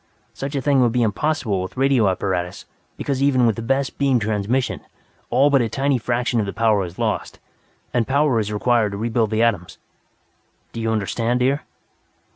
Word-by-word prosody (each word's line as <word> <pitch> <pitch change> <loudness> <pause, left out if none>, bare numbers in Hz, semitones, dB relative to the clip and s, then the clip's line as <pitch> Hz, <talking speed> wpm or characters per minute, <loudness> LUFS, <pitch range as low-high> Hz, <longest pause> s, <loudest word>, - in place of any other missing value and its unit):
Such 140 +1 -5
a 135 - 0
thing 140 -3 +3
would 120 -2 +2
be 125 -1 +2
impossible 115 -3 0
with 95 +7 -7
radio 130 -6 +3
apparatus 90 -1 -2 0.3
because 135 -2 -2
even 135 -3 +3
with 115 -3 +2
the - - -5
best 135 +3 -1
beam 135 -2 +3
transmission, 110 +4 -1 0.5
all 135 +4 +3
but 135 -2 +4
a 115 - -1
tiny 135 0 0
fraction 120 0 0
of 105 - -1
the 100 - -4
power 110 -3 +2
is 85 0 -10
lost, - - -2 0.6
and 120 -2 +1
power 140 -3 +2
is 105 -1 -2
required 110 -1 +1
to - - -4
rebuild 115 0 0
the 110 +1 +1
atoms. 100 -7 -1 1.0
Do 115 - -5
you 115 - -1
understand, 115 +3 -1
dear?" 135 +3 +2
115 Hz, 185 wpm, -21 LUFS, 105-135 Hz, 1.0 s, but